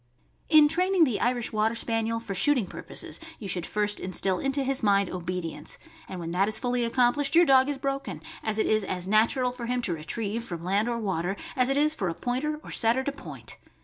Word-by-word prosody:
In 305 Hz, -2 st, +7 dB
training 365 Hz, +3 st, +3 dB
the 250 Hz, -9 st, +1 dB
Irish 245 Hz, -2 st, 0 dB
Water 215 Hz, +2 st, +1 dB
Spaniel 230 Hz, 0 st, 0 dB
for 225 Hz, -3 st, -6 dB
shooting 250 Hz, +4 st, +2 dB
pur -, -, -8 dB
poses, -, -, -5 dB, 0.2 s
you 205 Hz, -, -7 dB
should 180 Hz, -2 st, -2 dB
first 210 Hz, 0 st, 0 dB
instill 185 Hz, 0 st, 0 dB
into 275 Hz, 0 st, 0 dB
his 270 Hz, 0 st, 0 dB
mind 200 Hz, -2 st, +2 dB
obedience, 175 Hz, -4 st, -3 dB, 0.3 s
and 185 Hz, -, -6 dB
when 165 Hz, -1 st, -5 dB
that 190 Hz, +3 st, +2 dB
is 215 Hz, -, +3 dB
fully 245 Hz, -1 st, 0 dB
accomplished 250 Hz, +5 st, +2 dB
your 345 Hz, +1 st, +7 dB
dog 265 Hz, -1 st, +5 dB
is 285 Hz, -, -2 dB
broken, 275 Hz, 0 st, -3 dB, 0.2 s
as 220 Hz, -1 st, -2 dB
it 220 Hz, -, +2 dB
is 215 Hz, -1 st, +2 dB
as 185 Hz, -1 st, -3 dB
natural 230 Hz, +5 st, +2 dB
for 245 Hz, -1 st, -7 dB
him 250 Hz, 0 st, -1 dB
to 180 Hz, -, 0 dB
retrieve, 205 Hz, +8 st, -3 dB
from 170 Hz, -7 st, -6 dB
land 200 Hz, +6 st, +1 dB
or 235 Hz, -, -1 dB
water, 190 Hz, -4 st, -2 dB, 0.2 s
as 255 Hz, 0 st, +3 dB
it 275 Hz, -, +1 dB
is 305 Hz, +1 st, +3 dB
for 190 Hz, -, -2 dB
a 165 Hz, -, -4 dB
Pointer 290 Hz, +5 st, -2 dB
or -, -, -10 dB
Setter 235 Hz, +3 st, +3 dB
to 285 Hz, -, -1 dB
point. 280 Hz, -, -7 dB
230 Hz, 220 wpm, -27 LUFS, 195-265 Hz, 0.3 s, In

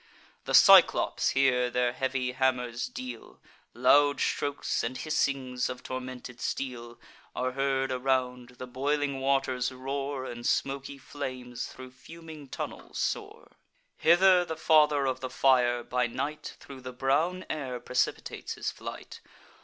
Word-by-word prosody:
The -, -, +1 dB
Cyclops -, -, +6 dB
here 125 Hz, -2 st, +3 dB
their 125 Hz, 0 st, 0 dB
heavy 130 Hz, -1 st, -1 dB
hammers 125 Hz, -2 st, 0 dB
deal; 125 Hz, -2 st, -8 dB, 0.4 s
Loud 140 Hz, +3 st, +4 dB
strokes, 145 Hz, 0 st, -1 dB
and 125 Hz, +3 st, -3 dB
hissings 135 Hz, -5 st, -1 dB
of 125 Hz, 0 st, -7 dB
tormented 130 Hz, -1 st, -7 dB
steel, 120 Hz, -3 st, -4 dB, 0.4 s
Are 130 Hz, 0 st, -1 dB
heard 135 Hz, 0 st, 0 dB
around; 125 Hz, -1 st, -1 dB
the 130 Hz, -, -6 dB
boiling 140 Hz, +2 st, -1 dB
waters 135 Hz, -2 st, 0 dB
roar, 135 Hz, +1 st, -4 dB
And 120 Hz, -2 st, -7 dB
smoky 140 Hz, +2 st, -1 dB
flames 130 Hz, -3 st, -6 dB
thro' 130 Hz, 0 st, -11 dB
fuming 160 Hz, +2 st, -12 dB
tunnels -, -, -7 dB
soar. -, -, -3 dB, 0.4 s
Hither 180 Hz, +2 st, +5 dB
the 160 Hz, -2 st, -5 dB
Father 150 Hz, -3 st, +4 dB
of 130 Hz, -1 st, -1 dB
the 130 Hz, -, -5 dB
Fire, 125 Hz, -3 st, +3 dB
by 125 Hz, +1 st, 0 dB
night, 150 Hz, +6 st, -5 dB
Thro' 135 Hz, -1 st, -11 dB
the 130 Hz, 0 st, -8 dB
brown 150 Hz, +8 st, 0 dB
air 130 Hz, -5 st, -4 dB
precipitates 125 Hz, +1 st, -2 dB
his -, -, -3 dB
flight. -, -, -9 dB
130 Hz, 130 wpm, -28 LUFS, 125-140 Hz, 0.4 s, Cyclops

